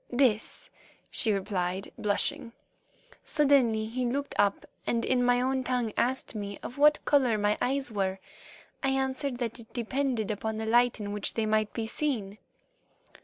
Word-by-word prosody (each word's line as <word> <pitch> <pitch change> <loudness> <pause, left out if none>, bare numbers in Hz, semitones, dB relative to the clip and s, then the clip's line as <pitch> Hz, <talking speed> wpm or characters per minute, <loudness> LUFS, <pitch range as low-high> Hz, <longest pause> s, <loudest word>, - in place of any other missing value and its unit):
"This," 250 - +1 0.4
she 225 - +2
replied, 190 -2 -2
blushing. 210 +2 -1 0.7
"Suddenly 270 -7 +3
he 245 +3 -3
looked 280 +3 -2
up 200 -1 +2 0.2
and 230 -1 +1
in 250 -1 +2
my 245 0 +4
own 260 +1 0
tongue 245 -4 -1
asked 260 +2 0
me 200 -2 -5
of 250 - -7
what 300 +1 +5
colour 265 -5 +4
were - - +1
my 205 0 +2
eyes. 270 -1 0
I 190 -1 0 0.7
answered 265 0 -1
that 240 -1 -3
it 225 0 -13
depended 245 -2 -1
upon 215 +1 -3
the 220 - -3
light 240 +1 +3
in 205 -1 -4
which 205 -1 -2
they 225 - +1
might 215 0 +1
be 230 - -2
seen. 220 -5 -2
235 Hz, 160 wpm, -29 LUFS, 215-260 Hz, 0.7 s, what